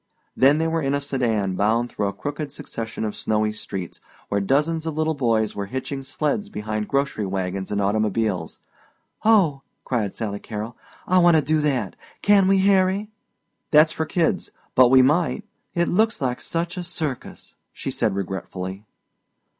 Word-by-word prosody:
Then 140 +3 +5
they 160 +1 +1
were 165 0 0
in 140 -1 0
a - - +1
sedan 115 -9 0
bound 115 +5 +1
through 100 - -1
a - - -1
crooked 145 +7 -5
succession 115 -5 -5
of 105 - -3
snowy 110 0 0
streets 95 -4 -7 0.3
where 100 0 +1
dozens 155 +9 +1
of 155 -1 -3
little 155 0 +1
boys 115 -6 +1
were 100 -1 -3
hitching 130 +3 -4
sleds 150 +9 -2
behind 105 - -3
grocery 140 -7 0
wagons 95 0 -3
and 100 - 0
automobiles. 105 -3 0 0.7
"Oh," 190 -11 +4 0.2
cried 110 -6 -1
Sally 100 -2 -3
Carrol, 110 +3 -6 0.3
"I 185 0 +4
want 175 -1 +6
to 155 - +5
do 155 +2 +1
that! 130 -9 0 0.3
Can 200 -2 +5
we 195 0 +4
Harry?" 195 +2 +2 0.6
"That's 155 +1 +6
for 160 - -2
kids. 170 -3 0 0.2
But 125 -1 +6
we 130 0 +7
might 155 +5 +2 0.2
" - - -50
"It 170 0 +2
looks 220 +4 +2
like 125 -2 -2
such 170 +2 -3
a 180 - -3
circus!" 155 -7 -5 0.2
she - - -5
said - - 0
regretfully. 95 +1 -5
130 Hz, 170 wpm, -23 LUFS, 105-160 Hz, 0.7 s, we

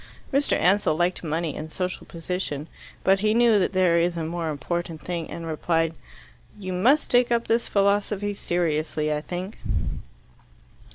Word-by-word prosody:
Mr. 280 +1 +2
Ansell 185 -3 +3
liked 175 +3 0
money 160 -1 -2
and 155 +1 -6
social 180 +1 -4
position. 165 -3 -4 0.4
But 195 0 +4
he 215 +2 +2
knew 235 -3 +5
that 180 - +1
there 180 -2 +4
is 170 0 +1
a 165 - -2
more 165 0 -2
important 165 +3 -3
thing, 170 -2 -4
and 165 +2 -6
replied, 165 +1 0 0.6
"You 185 -3 -5
must 250 +12 +3
take 245 0 +4
up 235 0 +2
this 230 +1 +1
philosophy 205 0 +1
seriously, 155 -4 -1
I 150 - -2
think." 180 +5 -6
175 Hz, 155 wpm, -25 LUFS, 165-200 Hz, 0.6 s, knew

